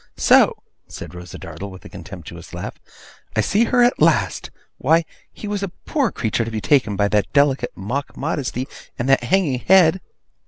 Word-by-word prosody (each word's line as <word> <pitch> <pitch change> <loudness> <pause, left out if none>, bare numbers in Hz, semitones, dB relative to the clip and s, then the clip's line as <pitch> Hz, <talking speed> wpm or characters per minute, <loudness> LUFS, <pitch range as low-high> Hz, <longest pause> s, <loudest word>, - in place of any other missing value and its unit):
'So!' - - +5 0.3
said 85 0 -9
Rosa 90 -2 -9
Dartle, 100 - -8
with 95 -1 -13
a - - -9
contemptuous 85 -3 -10
laugh, - - -6 0.6
'I 110 - +3
see 205 - +2
her 245 +1 +3
at 245 - +2
last! - - +2 0.3
Why, 165 +1 +3 0.3
he 210 - -8
was 205 -1 -2
a 200 - -1 0.2
poor 275 - 0
creature 115 0 -1
to 115 - -4
be 110 -1 -3
taken 115 -4 +2
by 100 +1 +2
that 105 -1 +1
delicate 140 -2 +2
mock 125 +9 -4
modesty, 135 -4 -2 0.3
and 120 - -2
that 135 -2 +4
hanging 145 -4 +1
head! 185 +2 +5
130 Hz, 180 wpm, -21 LUFS, -, 0.6 s, So